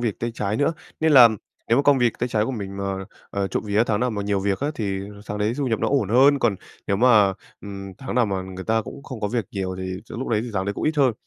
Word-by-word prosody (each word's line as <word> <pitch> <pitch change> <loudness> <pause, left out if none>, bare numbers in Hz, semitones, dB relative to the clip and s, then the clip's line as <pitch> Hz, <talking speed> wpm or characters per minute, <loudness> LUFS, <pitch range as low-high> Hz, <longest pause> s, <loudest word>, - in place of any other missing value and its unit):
việc 115 -4 -2
tay 120 - -2
trái 105 -2 -1
nữa. 145 +5 +2 0.3
Nên 160 -1 +3
là 125 -4 +10 0.4
nếu 115 - +4
mà - - +3
công 145 -1 +4
việc 120 -2 +3
tay 125 - -1
trái 110 -3 +1
của 115 - -2
mình 100 -6 -5
mà, 100 - -3 0.5
ờ, 100 -1 -1
trộm - - -2
vía 105 +2 +3
tháng 105 -1 0
nào 125 0 +1
mà 105 -2 -3
nhiều 100 -1 0
việc 100 0 -1
á 145 +2 0
thì 100 -5 -2 0.3
tháng 105 - -4
đấy 105 +2 +1
thu 140 - -1
nhập 115 -3 0
nó - - +1
ổn 135 -8 +1
hơn, 135 +6 +5
còn 115 -6 +1 0.3
nếu 100 - +1
mà, 110 -4 +5 0.3
ừm, 100 -1 -8
tháng 135 - -5
nào 120 -2 +3
mà 95 -2 -2
người 95 0 -8
ta 115 0 +1
cũng 140 - -10
không 130 -5 -8
có 105 - -1
việc 115 0 -1
nhiều 95 -2 -3
thì 95 0 -4
sẽ - - -9
lúc 130 - -4
đấy 110 -2 +1
thì 120 - -6
tháng 95 -1 0
đấy 100 - -1
cũng - - -4
ít 155 0 0
hơn. 135 -4 +4
110 Hz, 300 wpm, -23 LUFS, 100-125 Hz, 0.5 s, là